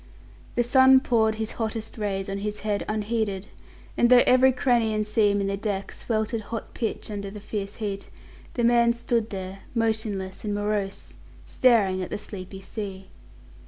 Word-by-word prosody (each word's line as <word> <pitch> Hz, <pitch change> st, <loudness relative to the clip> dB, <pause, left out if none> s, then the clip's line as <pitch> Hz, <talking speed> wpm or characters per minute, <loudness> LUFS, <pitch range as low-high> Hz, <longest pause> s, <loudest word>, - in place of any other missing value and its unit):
The 240 Hz, -, +3 dB
sun 260 Hz, +2 st, +6 dB
poured 220 Hz, -4 st, +2 dB
his 220 Hz, 0 st, -3 dB
hottest 220 Hz, 0 st, -3 dB
rays 195 Hz, -3 st, -2 dB
on 195 Hz, 0 st, -3 dB
his 210 Hz, +1 st, -4 dB
head 210 Hz, -1 st, -1 dB
unheeded, 215 Hz, -2 st, -1 dB, 0.5 s
and 240 Hz, -, +4 dB
though 250 Hz, -1 st, +8 dB
every 255 Hz, +1 st, +6 dB
cranny 240 Hz, -4 st, +2 dB
and 215 Hz, 0 st, 0 dB
seam 210 Hz, -1 st, +2 dB
in 200 Hz, -, 0 dB
the 195 Hz, 0 st, -1 dB
deck 200 Hz, -2 st, -3 dB
sweltered 220 Hz, 0 st, -2 dB
hot 225 Hz, +1 st, -6 dB
pitch 225 Hz, -1 st, -3 dB
under 200 Hz, -1 st, -4 dB
the 210 Hz, +1 st, -8 dB
fierce 205 Hz, -1 st, -5 dB
heat, 200 Hz, -3 st, -4 dB, 0.5 s
the 240 Hz, -, 0 dB
man 235 Hz, 0 st, +5 dB
stood 235 Hz, -1 st, -1 dB
there, 190 Hz, 0 st, -6 dB, 0.2 s
motionless 220 Hz, -4 st, -1 dB
and 205 Hz, -1 st, -2 dB
morose, 205 Hz, -1 st, -2 dB, 0.3 s
staring 205 Hz, -7 st, +3 dB
at 180 Hz, -, -4 dB
the -, -, -3 dB
sleepy 195 Hz, -2 st, -8 dB
sea. 195 Hz, -3 st, -6 dB
215 Hz, 165 wpm, -26 LUFS, 200-230 Hz, 0.5 s, though